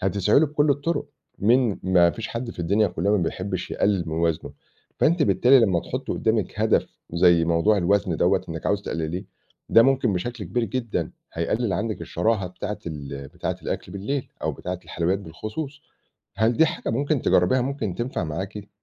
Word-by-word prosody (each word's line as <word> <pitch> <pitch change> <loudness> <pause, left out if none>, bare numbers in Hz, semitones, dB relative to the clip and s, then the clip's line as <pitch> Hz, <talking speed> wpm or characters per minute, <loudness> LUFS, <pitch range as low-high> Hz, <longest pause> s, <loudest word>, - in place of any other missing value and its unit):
هتسعي 95 +3 +3
له 160 - +4
بكُلّ 145 0 +1
الطرق، 145 +4 0 0.3
مين 115 0 +3
ما 90 -2 +4
فيش 115 +3 -6
حد 115 0 -4
في - - -13
الدنيا 100 +5 +2
كلّها 90 +3 -1
ما - - +4
بيحبش 95 +2 -3
يقلِّل 100 -3 +1
من 80 - -3
وزنه. 85 -2 -1 0.5
فأنتِ 165 0 +3
بالتالي 135 -1 +5
لمّا 95 -7 +3
تحطّي - - -4
قدّامِك - - -1
هدف - - +3 0.3
زي 85 -1 +5
موضوع 85 +6 +3
الوزن 95 -1 +1
دوَّة - - +3
إنِّك 80 -1 -5
عاوزة 100 0 +1
تقلِّليه، 85 +3 -3 0.4
ده 115 - +7
ممكن 130 -5 +3
بشكل 115 +4 -3
كبير 120 +7 -1
جدًا 115 +2 -2 0.2
هيقلِّل 100 +6 -1
عندِك 105 +5 -2
الشراهة 110 -4 0
بتاعة 105 +3 -5
ال 70 -3 -6
بتاعة - - -4
الأكل 90 - -4
بالليل، 125 +8 -3
أو - - 0
بتاعة 90 0 -5
الحلويات 90 +4 -1
بالخصوص، 110 - -7 0.5
هل 110 +3 +2
دي 160 - +6
حاجة - - -3
ممكن 140 +4 0
تجرّبيها، 90 +9 +3
ممكن 130 -8 -2
تنفع 120 -7 -2
معاكِ؟ 95 +6 -5
100 Hz, 170 wpm, -24 LUFS, 85-120 Hz, 0.5 s, ده